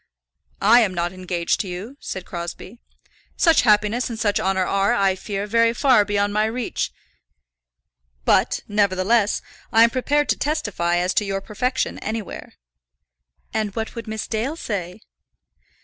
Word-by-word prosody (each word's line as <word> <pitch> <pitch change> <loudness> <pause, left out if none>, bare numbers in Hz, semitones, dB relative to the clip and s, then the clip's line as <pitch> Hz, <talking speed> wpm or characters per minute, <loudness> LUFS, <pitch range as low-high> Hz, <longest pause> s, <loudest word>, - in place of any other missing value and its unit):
"I 225 +4 +7
am 200 -6 +1
not 175 +1 -1
engaged 180 -2 -1
to 205 - -2
you," 190 +9 -7
said 185 -1 -6
Crosbie. 175 +5 -7 0.6
"Such 330 -3 +5
happiness 215 +2 +2
and 230 - -5
such 205 -3 +1
honour 190 -1 +1
are, 195 +1 +2
I 195 -1 +3
fear, 200 +1 -4
very 230 +2 +3
far 255 -5 +5
beyond 205 0 0
my 215 +1 +2
reach. 230 +1 -2 1.3
But, - - +3
nevertheless, 205 +1 +2 0.3
I 225 +1 +6
am 230 - +4
prepared 290 +4 +1
to - - +3
testify 205 - 0
as 180 +1 0
to - - +2
your 195 -1 -2
perfection 250 +6 -2
anywhere." 220 -2 -6 1.0
"And 215 -2 -2
what 225 -1 -3
would 230 -1 -7
Miss 220 0 -4
Dale 235 +7 -2
say?" 195 - -5
210 Hz, 150 wpm, -22 LUFS, 190-230 Hz, 1.3 s, I